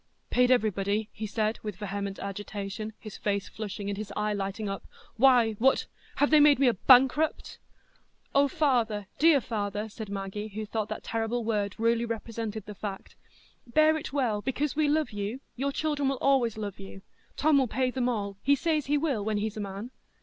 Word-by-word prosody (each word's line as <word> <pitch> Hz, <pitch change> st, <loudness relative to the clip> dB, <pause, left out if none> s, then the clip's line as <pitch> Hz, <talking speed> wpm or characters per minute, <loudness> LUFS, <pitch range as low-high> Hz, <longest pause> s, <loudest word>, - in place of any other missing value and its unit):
"Paid 250 Hz, 0 st, +4 dB
everybody?" 210 Hz, -3 st, +1 dB
he 215 Hz, 0 st, -5 dB
said, 215 Hz, +1 st, -1 dB
with 210 Hz, -3 st, -5 dB
vehement 200 Hz, 0 st, -4 dB
agitation, 205 Hz, +2 st, -5 dB
his 215 Hz, -2 st, -9 dB
face 200 Hz, -1 st, -1 dB
flushing, 205 Hz, -1 st, -6 dB
and 200 Hz, 0 st, -3 dB
his 210 Hz, -1 st, -6 dB
eye 210 Hz, 0 st, 0 dB
lighting 200 Hz, +1 st, -3 dB
up. 195 Hz, 0 st, -4 dB, 0.3 s
"Why—what—have 250 Hz, +3 st, +2 dB
they 305 Hz, -, +7 dB
made 295 Hz, -1 st, +7 dB
me 270 Hz, 0 st, +4 dB
a 240 Hz, -, +4 dB
bankrupt?" 265 Hz, -, +4 dB, 0.7 s
"Oh, 280 Hz, +1 st, +5 dB
father, 240 Hz, -8 st, +1 dB
dear 315 Hz, -1 st, +6 dB
father!" 210 Hz, -3 st, -3 dB
said 215 Hz, -1 st, -8 dB
Maggie, 200 Hz, +1 st, -4 dB
who 215 Hz, +1 st, -5 dB
thought 215 Hz, 0 st, -3 dB
that 215 Hz, -, -5 dB
terrible 230 Hz, +1 st, -2 dB
word 205 Hz, -2 st, -1 dB
really 230 Hz, +1 st, +2 dB
represented 225 Hz, -2 st, -4 dB
the 210 Hz, -, -7 dB
fact; 200 Hz, -1 st, -7 dB, 0.5 s
"bear 310 Hz, +5 st, +4 dB
it 315 Hz, -, -5 dB
well, 245 Hz, -7 st, 0 dB
because 270 Hz, +5 st, -1 dB
we 305 Hz, 0 st, +2 dB
love 305 Hz, -1 st, +1 dB
you; 205 Hz, +4 st, -4 dB, 0.2 s
your 275 Hz, +3 st, -1 dB
children 290 Hz, -2 st, 0 dB
will 270 Hz, -, -1 dB
always 250 Hz, -5 st, +2 dB
love 205 Hz, -3 st, -5 dB
you. 195 Hz, 0 st, -10 dB, 0.3 s
Tom 300 Hz, -1 st, +4 dB
will 260 Hz, -, +2 dB
pay 255 Hz, +3 st, 0 dB
them 250 Hz, -1 st, 0 dB
all; 200 Hz, -4 st, -3 dB
he 280 Hz, +1 st, +4 dB
says 305 Hz, 0 st, 0 dB
he 295 Hz, +1 st, +2 dB
will, 280 Hz, -8 st, 0 dB
when 215 Hz, 0 st, -1 dB
he's 215 Hz, 0 st, -2 dB
a -, -, -5 dB
man." 200 Hz, +4 st, -6 dB
220 Hz, 185 wpm, -28 LUFS, 205-265 Hz, 0.7 s, they